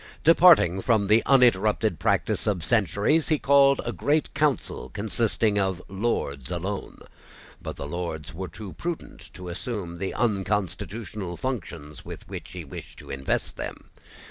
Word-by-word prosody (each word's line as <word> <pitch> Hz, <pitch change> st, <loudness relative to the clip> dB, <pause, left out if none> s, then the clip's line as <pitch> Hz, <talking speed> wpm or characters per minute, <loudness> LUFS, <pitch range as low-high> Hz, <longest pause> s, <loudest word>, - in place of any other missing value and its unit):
Departing 160 Hz, -, +6 dB
from 110 Hz, -1 st, +2 dB
the 110 Hz, +3 st, +5 dB
uninterrupted 110 Hz, -, +4 dB
practice -, -, +1 dB
of 90 Hz, -6 st, 0 dB
centuries, 110 Hz, -, +2 dB
he 155 Hz, -, +2 dB
called 140 Hz, -1 st, +5 dB
a -, -, -2 dB
Great 150 Hz, +2 st, 0 dB
Council 140 Hz, -, 0 dB
consisting 110 Hz, 0 st, 0 dB
of 95 Hz, -2 st, 0 dB
Lords 95 Hz, -, -2 dB
alone. 95 Hz, +3 st, -4 dB, 0.6 s
But -, -, -6 dB
the -, -, -6 dB
Lords 85 Hz, 0 st, -5 dB
were 95 Hz, +3 st, -5 dB
too 95 Hz, +3 st, -9 dB
prudent 170 Hz, -1 st, -6 dB
to 90 Hz, 0 st, -8 dB
assume 90 Hz, -1 st, -5 dB
the 95 Hz, +2 st, -4 dB
unconstitutional 100 Hz, -2 st, -2 dB
functions 85 Hz, -, -5 dB
with -, -, -9 dB
which -, -, -8 dB
he 90 Hz, -3 st, -7 dB
wished 70 Hz, -, -10 dB
to -, -, -10 dB
invest 70 Hz, 0 st, -2 dB
them. -, -, -7 dB
100 Hz, 145 wpm, -26 LUFS, 85-120 Hz, 0.6 s, Departing